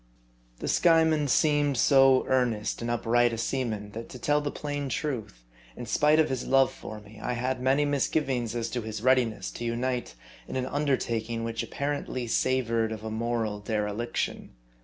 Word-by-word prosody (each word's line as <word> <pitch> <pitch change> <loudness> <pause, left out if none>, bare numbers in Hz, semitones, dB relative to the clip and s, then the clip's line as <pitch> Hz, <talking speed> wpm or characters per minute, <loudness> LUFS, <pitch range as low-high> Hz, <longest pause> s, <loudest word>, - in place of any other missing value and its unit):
THE - - -5
Skyeman 160 -3 +4
seemed 145 -1 +2
so 135 0 +5
earnest 120 -6 0
and 115 - -3
upright 120 0 +2
a - - -3
seaman, 110 -4 -2
that 115 +2 -7
to - - -8
tell 145 +4 +1
the 145 - -2
plain 145 -1 -4
truth, 115 - -4 0.3
in - - -6
spite 150 +1 +3
of 160 - +4
his 130 -2 -3
love 135 -1 +4
for 110 - -9
me, 105 +1 -15
I 125 - -2
had 125 +1 -2
many 135 +3 +3
misgivings 135 -4 0
as 115 -1 -2
to 125 - -2
his 110 0 -6
readiness 125 -4 +2
to - - -7
unite 120 +1 -2 0.3
in - - -6
an 130 -1 -1
un 145 +3 -2
dertaking 115 -3 -1
which 115 0 -2
apparently 140 -3 -3
savored 115 -2 +1
of 110 -1 -6
a 110 - -4
moral 110 -2 -2
dereliction. 105 +2 -3
125 Hz, 175 wpm, -27 LUFS, 115-135 Hz, 0.3 s, so